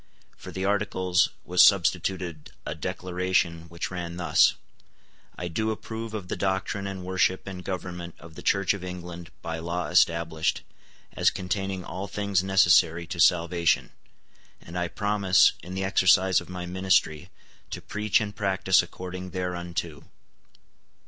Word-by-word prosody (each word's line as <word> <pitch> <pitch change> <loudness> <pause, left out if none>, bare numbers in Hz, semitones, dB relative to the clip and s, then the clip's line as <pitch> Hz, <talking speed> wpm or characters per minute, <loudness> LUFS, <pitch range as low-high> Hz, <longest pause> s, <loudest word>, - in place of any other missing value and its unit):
For - - -10
the 95 0 -3
Articles 95 -3 +1 0.2
was - - +4
substituted 85 -5 +2 0.2
a - - -3
Declaration 90 -2 -1
which 85 +2 -5
ran 85 -2 -5
thus; 90 - +4 0.8
"I 90 - -4
do 110 +6 -1
approve 110 0 -5
of 100 -4 -5
the - - -3
doctrine 95 +1 -2
and 95 -2 -6
worship 95 0 +1
and 95 -2 -7
government 90 -2 -5
of 80 -1 -13
the - - -10
Church 100 -1 +2
of 100 -2 -7
England 90 -2 -7
by 80 0 -4
law 85 -1 -3
established, 85 -1 +2 0.5
as - - +3
containing 95 0 -3
all 95 +2 -5
things 100 -3 0
necessary 85 -3 +4
to 85 +1 -7
salvation; 85 0 +3 0.7
and 85 - -12
I 90 0 0
promise, 100 -1 +3
in 90 +3 -8
the 95 - -2
exercise 95 -1 +4
of - - -13
my 90 -1 -5
ministry, 90 -2 +1 0.4
to - - -5
preach 105 -1 0
and 105 -2 -4
practice 95 -2 +3
according 90 +1 -7
thereunto." 90 -3 -4
90 Hz, 140 wpm, -26 LUFS, 85-95 Hz, 0.8 s, was